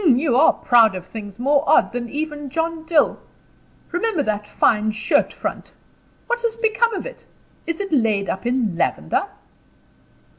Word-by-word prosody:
"You 270 Hz, -4 st, +3 dB
are 260 Hz, -, +5 dB
proud 225 Hz, -5 st, +4 dB
of 185 Hz, -1 st, -7 dB
things 205 Hz, 0 st, -9 dB
more 280 Hz, +3 st, +2 dB
odd -, -, +4 dB
than 240 Hz, -1 st, -4 dB
even 295 Hz, 0 st, -4 dB
John 325 Hz, +2 st, -3 dB
Dill. 320 Hz, -3 st, +2 dB, 0.7 s
Remember 355 Hz, -3 st, 0 dB
that 210 Hz, -3 st, -2 dB
fine 215 Hz, -1 st, +2 dB
shirt 250 Hz, +8 st, +1 dB
front! -, -, -6 dB, 0.5 s
What 485 Hz, 0 st, -2 dB
has 465 Hz, -1 st, -1 dB
become 460 Hz, 0 st, +1 dB
of -, -, -5 dB
it? -, -, -10 dB, 0.4 s
Is 335 Hz, -1 st, -3 dB
it 395 Hz, -4 st, -4 dB
laid 215 Hz, -7 st, +1 dB
up 190 Hz, +5 st, -3 dB
in 240 Hz, -7 st, 0 dB
lavender?" 385 Hz, -, -1 dB
285 Hz, 155 wpm, -21 LUFS, 220-335 Hz, 0.7 s, are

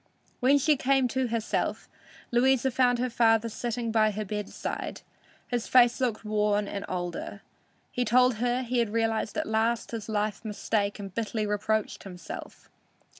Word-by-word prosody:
When 270 Hz, +3 st, +5 dB
she 295 Hz, +1 st, +3 dB
came 270 Hz, -1 st, +2 dB
to 260 Hz, +1 st, 0 dB
herself, 230 Hz, -2 st, -2 dB, 0.4 s
Louisa 260 Hz, +1 st, +3 dB
found 250 Hz, -1 st, +3 dB
her 250 Hz, +1 st, 0 dB
father 225 Hz, -1 st, +3 dB
sitting 235 Hz, +1 st, -3 dB
by 220 Hz, -1 st, +4 dB
her 215 Hz, +1 st, -4 dB
bedside. 210 Hz, 0 st, -4 dB, 0.5 s
His 245 Hz, -2 st, -2 dB
face 245 Hz, 0 st, +5 dB
looked 230 Hz, -4 st, -1 dB
worn 210 Hz, -1 st, +1 dB
and 200 Hz, -, -4 dB
older. 180 Hz, +2 st, -4 dB, 0.5 s
He 245 Hz, -, 0 dB
told 250 Hz, +1 st, +4 dB
her 245 Hz, +2 st, 0 dB
he 245 Hz, -1 st, +1 dB
realized 225 Hz, 0 st, -1 dB
at -, -, 0 dB
last 225 Hz, +2 st, 0 dB
his 225 Hz, -2 st, -5 dB
life 210 Hz, 0 st, -1 dB
mistake 210 Hz, -1 st, -1 dB
and 195 Hz, -3 st, -8 dB
bitterly 220 Hz, 0 st, -2 dB
reproached 210 Hz, +1 st, -1 dB
himself. 180 Hz, -4 st, -9 dB
225 Hz, 150 wpm, -28 LUFS, 210-245 Hz, 0.5 s, When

